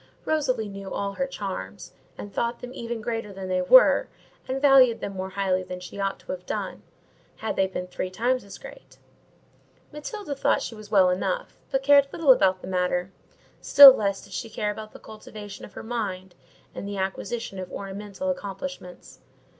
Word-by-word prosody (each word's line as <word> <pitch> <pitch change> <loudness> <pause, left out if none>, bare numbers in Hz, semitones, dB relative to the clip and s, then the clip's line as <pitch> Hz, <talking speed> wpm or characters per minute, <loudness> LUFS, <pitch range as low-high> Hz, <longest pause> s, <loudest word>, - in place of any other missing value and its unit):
Rosalie 255 -8 0
knew 195 -1 -8
all 200 0 -3
her 270 +5 -2
charms, 100 - -6 0.2
and 205 - -8
thought 235 0 -1
them 250 0 -8
even 235 -2 -5
greater 225 -2 -3
than 190 -1 -7
they 185 0 +1
were, - - +6 0.4
and 260 +1 -2
valued 270 -4 +6
them 200 - -5
more 190 0 -5
highly 190 -1 0
than 180 0 -7
she 180 +2 -9
ought 195 0 -1
to - - -7
have 180 -1 -6
done, - - -4 0.5
had 220 - -4
they 190 - +2
been 185 -1 -5
three 180 0 -5
times 245 +7 0
as 200 - -11
great; - - -13 1.0
Matilda 300 +3 -6
thought 275 - +1
she - - -5
was 215 -2 -12
well 190 -3 +5
enough, - - -3
but 270 0 -1
cared 280 0 +5
little 310 -5 +4
about 190 -6 +3
the - - -7
matter; 180 0 -1 0.5
still 280 -2 +10
less 200 -4 -2
did - - -13
she 230 - -4
care 210 -1 -2
about 215 +1 -8
the - - -12
cultivation 210 -1 -10
of - - -16
her - - -8
mind, 195 -6 -4 0.4
and 200 - -6
the 200 0 -5
acquisition 195 +2 -4
of 185 -1 -7
ornamental 200 +7 -4
accomplishments. 200 -3 -8
205 Hz, 185 wpm, -25 LUFS, 190-250 Hz, 1.0 s, still